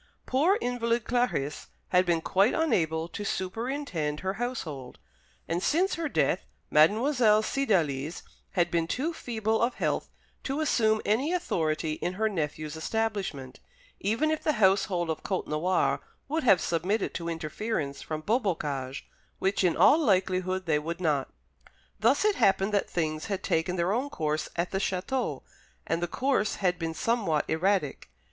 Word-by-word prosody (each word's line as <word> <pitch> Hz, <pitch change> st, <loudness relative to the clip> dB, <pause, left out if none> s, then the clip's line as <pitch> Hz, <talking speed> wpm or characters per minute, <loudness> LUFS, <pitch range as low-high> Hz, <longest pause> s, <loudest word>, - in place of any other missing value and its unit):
Poor 320 Hz, +10 st, +3 dB
invalid 240 Hz, -1 st, 0 dB
Clarice 225 Hz, -, -1 dB, 0.2 s
had 180 Hz, 0 st, +3 dB
been 170 Hz, -2 st, +2 dB
quite 195 Hz, +7 st, +2 dB
unable 165 Hz, -, +1 dB
to 175 Hz, +4 st, -6 dB
superintend 190 Hz, -, -3 dB
her 190 Hz, 0 st, -1 dB
household; 155 Hz, -, -4 dB, 0.5 s
and 170 Hz, +2 st, -1 dB
since 355 Hz, -, +2 dB
her 330 Hz, -2 st, -2 dB
death -, -, +1 dB, 0.2 s
Mademoiselle 215 Hz, -, +4 dB
Cydalise 165 Hz, -, 0 dB, 0.3 s
had 175 Hz, -1 st, +1 dB
been 165 Hz, -1 st, +1 dB
too 295 Hz, -, -1 dB
feeble 220 Hz, -6 st, -1 dB
of 235 Hz, +2 st, +1 dB
health -, -, -1 dB, 0.3 s
to 275 Hz, +2 st, -2 dB
assume 220 Hz, -8 st, +2 dB
any 255 Hz, +10 st, +1 dB
authority 160 Hz, -, 0 dB
in 180 Hz, -, -1 dB
her 220 Hz, +4 st, +1 dB
nephew's 155 Hz, -5 st, -3 dB
establishment, 190 Hz, -, -3 dB, 0.4 s
even 230 Hz, +10 st, +1 dB
if 315 Hz, -, -1 dB
the 305 Hz, -, +1 dB
household 190 Hz, -, +2 dB
of 160 Hz, -, -4 dB
Côtenoir 180 Hz, -1 st, 0 dB, 0.3 s
would 315 Hz, +3 st, -1 dB
have 195 Hz, -, +5 dB
submitted 185 Hz, +6 st, 0 dB
to 170 Hz, -1 st, -4 dB
interference 160 Hz, -2 st, -3 dB
from 155 Hz, -1 st, -4 dB
Beaubocage, 155 Hz, -, -1 dB, 0.3 s
which 195 Hz, +1 st, 0 dB
in 175 Hz, -3 st, +2 dB
all 305 Hz, -, +6 dB
likelihood 185 Hz, -, +1 dB
they 150 Hz, -3 st, +2 dB
would 170 Hz, +3 st, -5 dB
not. 150 Hz, -6 st, 0 dB, 0.7 s
Thus -, -, +3 dB
it 425 Hz, -1 st, +3 dB
happened 195 Hz, +1 st, +3 dB
that 200 Hz, -, +1 dB
things 155 Hz, -2 st, -2 dB
had 200 Hz, -3 st, -3 dB
taken 165 Hz, +3 st, 0 dB
their 175 Hz, +2 st, +1 dB
own 260 Hz, +5 st, -1 dB
course 155 Hz, -, -2 dB
at 170 Hz, +1 st, -1 dB
the 195 Hz, -, 0 dB
château, 195 Hz, +7 st, -2 dB, 0.4 s
and 165 Hz, -, -1 dB
the 175 Hz, -, 0 dB
course 250 Hz, 0 st, 0 dB
had 180 Hz, -3 st, 0 dB
been 165 Hz, -1 st, -3 dB
somewhat 200 Hz, -11 st, +1 dB
erratic. 165 Hz, -, 0 dB
190 Hz, 150 wpm, -28 LUFS, 160-230 Hz, 0.7 s, all